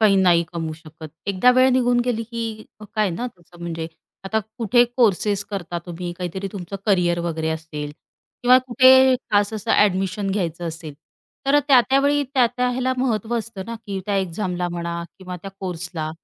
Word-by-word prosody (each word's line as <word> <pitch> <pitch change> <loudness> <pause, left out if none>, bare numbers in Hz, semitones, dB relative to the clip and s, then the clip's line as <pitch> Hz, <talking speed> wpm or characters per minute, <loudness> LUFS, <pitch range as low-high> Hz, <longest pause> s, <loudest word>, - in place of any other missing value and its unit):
काही 205 -3 +5
नाही 175 -3 +4
कमवू 165 -2 -3
शकत 155 0 -11 0.2
एकदा 200 +5 +4
वेळ 260 +1 +6
निघून 245 -1 +3
गेली, 235 -2 -1
की 225 -1 -5 0.3
काय 215 -4 +2
ना, 235 +9 -3
तसं 175 0 -19
म्हणजे 165 -1 -4 0.4
आता 220 +3 0 0.2
कुठे 240 +2 +4
कोर्सेस 205 -3 +2
करता 175 -4 -4
तुम्ही, 175 0 -5
काहीतरी 190 +2 -4
तुमचं 195 -1 -6
करियर 175 -4 +2
वगैरे 160 -2 -2
असेल 155 -2 -5 0.5
किंवा 250 +1 +7
कुठे 260 +1 +6 0.2
खास 205 0 +2
असं 220 +2 -4
एडमिशन 195 0 +2
घ्यायचं 175 -4 -2
असेल, 160 -2 -8 0.5
तर 285 +1 +5
त्या-त्या 265 0 +5
वेळी 285 +1 +2
त्या-त्या 250 0 +2
ह्याला 255 +1 0
महत्त्व 235 -2 0
असतं 220 -3 -6
ना, 230 - -5
की 195 -1 -3
त्या 200 -1 0
एक्झामला 180 -1 -2
म्हणा 170 0 -4 0.2
किंवा 180 -1 -7
त्या 195 - -7
कोर्सला 175 -3 -4
195 Hz, 165 wpm, -22 LUFS, 175-235 Hz, 0.5 s, किंवा